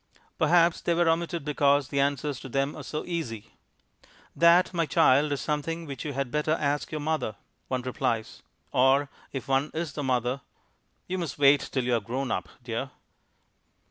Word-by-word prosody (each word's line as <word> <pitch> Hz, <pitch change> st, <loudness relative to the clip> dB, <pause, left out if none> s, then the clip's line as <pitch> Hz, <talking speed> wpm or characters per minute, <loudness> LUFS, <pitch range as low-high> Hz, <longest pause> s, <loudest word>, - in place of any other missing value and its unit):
Perhaps 170 Hz, -1 st, +4 dB
they 170 Hz, -, +1 dB
were 170 Hz, 0 st, +2 dB
omitted 165 Hz, -1 st, 0 dB
because 145 Hz, -1 st, +2 dB
the 140 Hz, -, -1 dB
answers 140 Hz, 0 st, 0 dB
to 135 Hz, -, -9 dB
them 135 Hz, +3 st, -1 dB
are -, -, -7 dB
so 155 Hz, -, -5 dB
easy. 130 Hz, -12 st, -4 dB, 0.8 s
"That, 170 Hz, +2 st, +5 dB
my 165 Hz, -2 st, 0 dB
child, 145 Hz, +2 st, +4 dB
is 140 Hz, -, -1 dB
something 165 Hz, +2 st, -2 dB
which 140 Hz, -4 st, -6 dB
you 145 Hz, -, -3 dB
had 135 Hz, -2 st, -2 dB
better 150 Hz, +2 st, +1 dB
ask 145 Hz, -2 st, -1 dB
your 155 Hz, -, -3 dB
mother," 155 Hz, -8 st, -1 dB, 0.3 s
one 130 Hz, -1 st, -2 dB
replies; 115 Hz, -3 st, -2 dB, 0.3 s
or 135 Hz, +2 st, +3 dB, 0.2 s
if 135 Hz, -, -5 dB
one 135 Hz, +2 st, +1 dB
is 160 Hz, -2 st, -3 dB
the 150 Hz, -, -4 dB
mother, 130 Hz, 0 st, 0 dB, 0.6 s
"You 185 Hz, +1 st, -3 dB
must 170 Hz, -5 st, -4 dB
wait 140 Hz, 0 st, +4 dB
till 130 Hz, -, 0 dB
you 125 Hz, 0 st, 0 dB
are 115 Hz, -, +3 dB
grown 125 Hz, +5 st, -3 dB
up, 90 Hz, 0 st, -2 dB
dear." 120 Hz, +3 st, -3 dB
140 Hz, 175 wpm, -27 LUFS, 130-160 Hz, 0.8 s, That